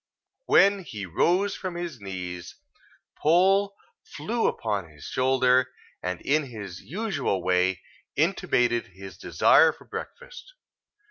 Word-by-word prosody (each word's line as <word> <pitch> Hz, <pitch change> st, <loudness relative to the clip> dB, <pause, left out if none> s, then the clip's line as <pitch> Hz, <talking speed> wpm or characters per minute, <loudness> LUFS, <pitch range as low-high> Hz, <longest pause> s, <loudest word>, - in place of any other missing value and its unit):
When 200 Hz, 0 st, +5 dB
he 105 Hz, -, -7 dB
rose 180 Hz, -, +1 dB
from 185 Hz, -2 st, -5 dB
his 175 Hz, -9 st, -6 dB
knees, 90 Hz, -3 st, -6 dB, 0.7 s
Poll 195 Hz, +5 st, +3 dB, 0.3 s
flew 225 Hz, +11 st, -2 dB
upon 100 Hz, -6 st, -2 dB
his 75 Hz, -2 st, -16 dB
shoulder, 130 Hz, 0 st, +2 dB, 0.3 s
and 90 Hz, 0 st, -3 dB
in 150 Hz, +1 st, +1 dB
his 100 Hz, -7 st, -8 dB
usual 190 Hz, -, -2 dB
way, 90 Hz, +1 st, +1 dB, 0.3 s
intimated 120 Hz, -1 st, +1 dB
his 95 Hz, +1 st, -11 dB
desire -, -, +4 dB
for -, -, -18 dB
breakfast. -, -, -9 dB
130 Hz, 115 wpm, -26 LUFS, -, 0.7 s, When